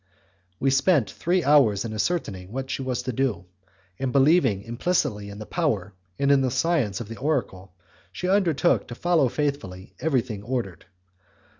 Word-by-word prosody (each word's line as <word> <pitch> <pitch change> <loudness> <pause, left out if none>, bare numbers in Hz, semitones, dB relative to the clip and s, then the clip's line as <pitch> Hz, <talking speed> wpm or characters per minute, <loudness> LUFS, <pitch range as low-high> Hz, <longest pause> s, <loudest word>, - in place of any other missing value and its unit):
We 135 - +2
spent 135 - +3
three 180 +1 0
hours 130 -9 +4
in 110 - -4
ascertaining 105 - -2
what 130 +2 -4
she - - -3
was 130 -2 -2
to 130 - -3
do, 115 -8 -1 0.5
and, 135 -2 -1
believing 135 - +3
implicitly 115 - -1
in 100 - -9
the 110 - -7
power 110 - -1 0.2
and 140 0 +2
in 140 -1 +5
the 130 - +1
science 135 - 0
of 115 - -6
the 115 - -8
oracle, 100 -10 -2 0.4
she 180 - -4
undertook 185 -7 +2
to 120 - -7
follow 165 -3 +2
faithfully 115 -11 -3
everything 125 -9 -1
ordered. 110 -7 -4
130 Hz, 160 wpm, -25 LUFS, 105-150 Hz, 0.5 s, in